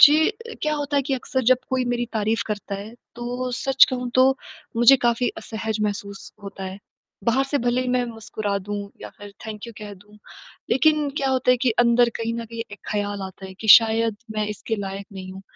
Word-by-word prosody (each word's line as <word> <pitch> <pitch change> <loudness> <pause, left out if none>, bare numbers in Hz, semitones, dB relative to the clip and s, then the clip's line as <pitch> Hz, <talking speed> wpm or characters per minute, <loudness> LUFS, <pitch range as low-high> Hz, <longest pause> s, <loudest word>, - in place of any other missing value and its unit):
जी 295 0 +10
अ, 460 +2 -8
क्या 305 - +1
होता 290 -1 -2
है 280 - +3
कि 270 - +2
अक्सर 260 +1 -2
जब 255 - +6
कोई 260 -1 +1
मेरी 240 0 -1
तारीफ़ 220 +1 0
करता 205 -1 -4
है, 205 +3 -7 0.2
तो 245 +1 -4
सच 270 0 +6
कहूँ 250 -1 -3
तो 255 0 +6 0.5
मुझे 240 +4 +7
काफ़ी 240 +1 +2
असहज 220 -1 -4
महसूस 200 -1 -4
होता 195 -1 -7
है। 190 +1 -6 0.5
बाहर 260 +4 +3
से 285 +1 -1
भले 245 +1 +2
ही 255 - -3
मैं 250 -1 +2
मुस्कुरा 215 -2 -3
दूँ 205 0 -3 0.2
या - - -7
फिर 205 0 -11
थैंक 215 0 -6
यू 235 - -9
कह 210 -1 -8
दूँ। 205 +2 -19 0.5
लेकिन 305 +1 +3
क्या 275 -2 0
होता 260 -1 +2
है 250 - +5
कि 250 - +4
अंदर 240 0 +5
कहीं 230 0 -2
न 235 0 -4
कहीं 230 0 -6
एक 205 - -9
ख़्याल 205 -1 -2
आता 190 0 -8
है, 190 - -10
कि 220 +3 -7
शायद 225 0 +6 0.2
मैं 215 0 0
इसके 210 +2 -3
लायक 195 0 -5
नहीं 185 -1 -8
हूँ। 190 +1 -10
230 Hz, 215 wpm, -23 LUFS, 205-255 Hz, 0.5 s, जी